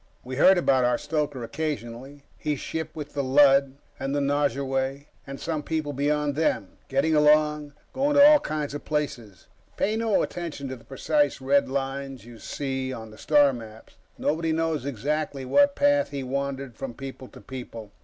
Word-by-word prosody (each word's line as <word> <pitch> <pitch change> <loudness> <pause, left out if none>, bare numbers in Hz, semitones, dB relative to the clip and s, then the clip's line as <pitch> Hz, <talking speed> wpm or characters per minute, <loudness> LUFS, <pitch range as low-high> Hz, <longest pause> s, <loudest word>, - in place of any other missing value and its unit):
We 130 +1 -6
heard 190 +6 +6
about 135 -7 +3
our 125 0 +2
stoker, 150 -5 -2
occasionally. 135 0 -5
He 150 -2 -2
shipped 160 +3 -5
with 150 -2 -7
the 140 -1 -1
Lud, 135 0 +5 0.2
and 135 +1 -2
the - - +1
Nosurwey, 140 -1 -1 0.2
and 135 0 -7
some 160 -2 -2
people 155 -1 -3
beyond 145 +1 0
them, 135 -10 -1
getting 140 +4 +1
along, 150 -1 +3 0.2
going 285 +2 +1
to 285 0 +9
all 300 0 +7
kinds 150 - -3
of 145 - -6
places. 125 -10 -4 0.3
Pay 210 +2 +1
no 225 -2 +2
attention 165 -5 -5
to 130 - -5
the 120 - -16
precise 145 +1 0
red 140 +1 +2
lines 135 -1 -4
you 120 -1 -12
see 135 -2 -3
on 110 -3 -8
the 110 - -14
star 145 -2 +4
maps; 110 -2 -11 0.2
nobody 160 +1 0
knows 160 -3 -1
exactly 140 +2 -2
what 285 - +4
path 285 0 +3
he 140 -2 -4
wandered 135 -1 -3
from 120 0 -6
people 135 -1 -8
to - - -14
people. 115 -5 -9
140 Hz, 175 wpm, -26 LUFS, 130-150 Hz, 0.3 s, to